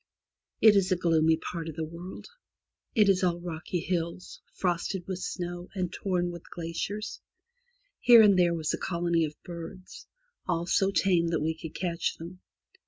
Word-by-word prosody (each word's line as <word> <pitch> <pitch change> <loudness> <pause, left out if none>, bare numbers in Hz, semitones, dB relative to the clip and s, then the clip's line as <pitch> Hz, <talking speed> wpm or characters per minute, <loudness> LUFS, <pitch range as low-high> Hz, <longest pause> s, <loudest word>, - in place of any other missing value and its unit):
It 215 -2 +8
is 190 -2 +2
a - - +5
gloomy 160 -2 +3
part 165 -1 -5
of 155 - -8
the 160 -1 -2
world. 170 +4 -9 0.7
It 210 -3 +5
is 195 -1 +3
all 175 -1 +1
rocky 170 0 -4
hills, 170 0 -3
frosted 180 0 -1
with 185 -2 -4
snow, 175 -1 -5
and 180 -2 -2
torn 180 -3 -1
with 170 -1 -10
glaciers. 175 +5 -4 0.8
Here 235 -2 +8
and 205 -2 +6
there 175 -2 +3
was 160 -2 -1
a - - -2
colony 170 -2 +1
of 150 0 -7
birds, 175 +1 -9 0.4
all 170 -2 0
so 195 +2 +2
tame 180 -3 +2
that 165 -1 0
we 160 +1 0
could 160 -1 -9
catch 170 -2 -2
them. 175 +3 -9
175 Hz, 170 wpm, -28 LUFS, 165-185 Hz, 0.8 s, It